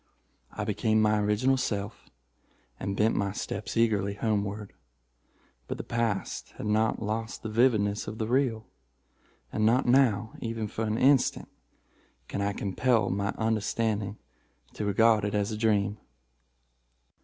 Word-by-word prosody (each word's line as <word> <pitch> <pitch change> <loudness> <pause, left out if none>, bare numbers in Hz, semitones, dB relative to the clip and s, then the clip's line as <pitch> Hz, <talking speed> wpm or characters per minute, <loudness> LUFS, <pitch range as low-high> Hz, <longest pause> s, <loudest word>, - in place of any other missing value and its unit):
I - - -4
became 110 0 +1
my 105 0 +3
original 105 +6 +2
self, 105 -4 -3 0.7
and 100 0 -3
bent 110 +1 +3
my 100 -1 -1
steps - - -4
eagerly 100 -3 +2
homeward—but 85 - -6
the - - -5
past 115 -4 -2
had - - -7
not 110 +1 +1
lost 110 +2 -3
the 110 - -4
vividness 110 -3 +2
of 105 +1 -5
the 110 - -1
real—and 110 - -4
not 120 +5 +3
now, 120 -4 +3
even 115 -2 -3
for 110 +2 -3
an 110 +1 -1
instant, 130 0 +3 0.8
can 100 - -3
I 100 0 +1
compel 110 +4 +1
my 100 +1 -1
understanding 110 -1 -1 0.6
to 105 - -4
regard 110 +1 +4
it 105 0 -1
as 105 +1 0
a - - -2
dream." 105 -1 +1
110 Hz, 130 wpm, -28 LUFS, 100-115 Hz, 0.8 s, regard